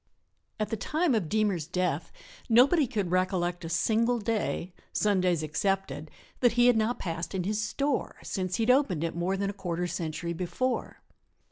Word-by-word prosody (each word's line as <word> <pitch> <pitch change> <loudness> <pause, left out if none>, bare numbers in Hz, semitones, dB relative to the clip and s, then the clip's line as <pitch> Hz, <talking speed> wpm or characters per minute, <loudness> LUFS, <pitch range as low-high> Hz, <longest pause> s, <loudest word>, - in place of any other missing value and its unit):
At 215 - -1
the 225 - -1
time 310 - +1
of 200 -9 0
Deemer's 205 -7 +1
death 180 +1 -1 0.4
nobody 265 +6 +5
could 205 -7 -2
recollect 180 -1 0
a 165 - -5
single 225 +8 +2
day, 210 -5 -2 0.2
Sundays 185 -6 +2
excepted, 155 -2 -1 0.3
that 245 -2 +4
he 240 0 +4
had 245 -1 +6
not 220 +2 +1
passed 170 +2 -4
in 185 - -1
his 210 +3 -1
"store," 275 +6 -1
since 185 -2 -2
he 225 - 0
had 240 - +5
opened 235 - +2
it 165 - -2
more 180 +3 0
than 200 0 -1
a - - -11
quarter 180 -3 -3
century 170 0 -3
before. 235 +9 -2
195 Hz, 170 wpm, -28 LUFS, 175-225 Hz, 0.4 s, had